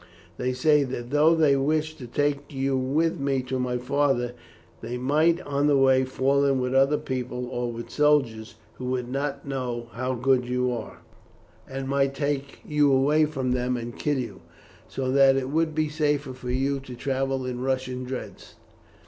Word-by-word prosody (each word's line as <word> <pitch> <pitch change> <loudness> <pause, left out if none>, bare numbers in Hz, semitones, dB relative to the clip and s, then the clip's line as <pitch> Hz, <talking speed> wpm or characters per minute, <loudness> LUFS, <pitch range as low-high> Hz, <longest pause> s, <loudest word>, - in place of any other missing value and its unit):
They 125 0 -1
say 150 +3 +3
that 125 -2 -5
though 155 +3 +5
they 155 -4 +4
wish 155 +3 0
to 125 - -8
take 145 +2 -1
you 135 -1 0
with 145 +6 0
me 135 -2 0
to 130 0 -3
my 125 -1 -1
father, 125 -1 +1 0.5
they 120 +2 -4
might 155 +7 +2
on 145 0 0
the 145 -1 +4
way 130 -1 +4
fall 135 +2 +1
in 135 -2 +2
with 125 0 -1
other 135 +3 +4
people 125 -2 -4
or 120 -1 -2
with 115 0 -8
soldiers, 135 -7 +1 0.2
who 130 - -5
would 125 -1 -2
not 140 +1 -3
know 125 -3 -3
how 130 +2 -2
good 125 +1 +2
you 125 0 0
are, 115 -3 -6 0.7
and 135 0 -4
might 135 0 +1
take 140 0 -3
you 150 -1 +3
away 145 +4 +4
from 135 -4 -2
them 125 0 0
and 120 0 -6
kill 145 -2 0
you, 125 -3 -5 0.5
so 130 -1 -2
that 135 0 +5
it 135 0 -2
would 160 0 0
be 155 -1 +1
safer 145 -3 -1
for 125 -1 -8
you 135 +2 0
to 130 -2 -10
travel 135 0 -1
in 125 -1 -4
Russian 130 -1 -2
dress. 125 0 -7
135 Hz, 180 wpm, -25 LUFS, 125-145 Hz, 0.7 s, though